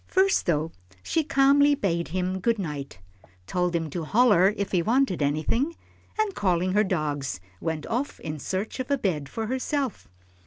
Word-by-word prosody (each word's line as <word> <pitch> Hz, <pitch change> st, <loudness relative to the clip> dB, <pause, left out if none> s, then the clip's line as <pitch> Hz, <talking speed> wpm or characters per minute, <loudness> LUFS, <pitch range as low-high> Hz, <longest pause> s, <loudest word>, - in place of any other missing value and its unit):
First 385 Hz, +1 st, +2 dB
though, 160 Hz, -1 st, +1 dB, 0.3 s
she 325 Hz, -, +1 dB
calmly 285 Hz, +1 st, +4 dB
bade 170 Hz, -8 st, -1 dB
him 185 Hz, +2 st, -2 dB
"Good 230 Hz, +4 st, +1 dB
night," 150 Hz, -, -5 dB, 0.5 s
told 180 Hz, -, 0 dB
him 165 Hz, -1 st, 0 dB
to 170 Hz, +3 st, -3 dB
"holler," 205 Hz, 0 st, +4 dB
if 200 Hz, -1 st, -2 dB
he 180 Hz, -, +2 dB
wanted 230 Hz, -, +1 dB
anything, 155 Hz, -, 0 dB, 0.4 s
and, 435 Hz, -2 st, +1 dB
calling 185 Hz, -, +1 dB
her 210 Hz, +1 st, +4 dB
dogs, 145 Hz, -, -2 dB, 0.2 s
went 160 Hz, -2 st, -3 dB
off 260 Hz, +5 st, -2 dB
in 155 Hz, -1 st, -5 dB
search 195 Hz, -, -3 dB
of 260 Hz, -, -3 dB
a 280 Hz, -, +2 dB
bed 155 Hz, -, -2 dB
for 225 Hz, +7 st, -3 dB
herself. 260 Hz, +1 st, -2 dB
190 Hz, 165 wpm, -26 LUFS, 160-260 Hz, 0.5 s, calmly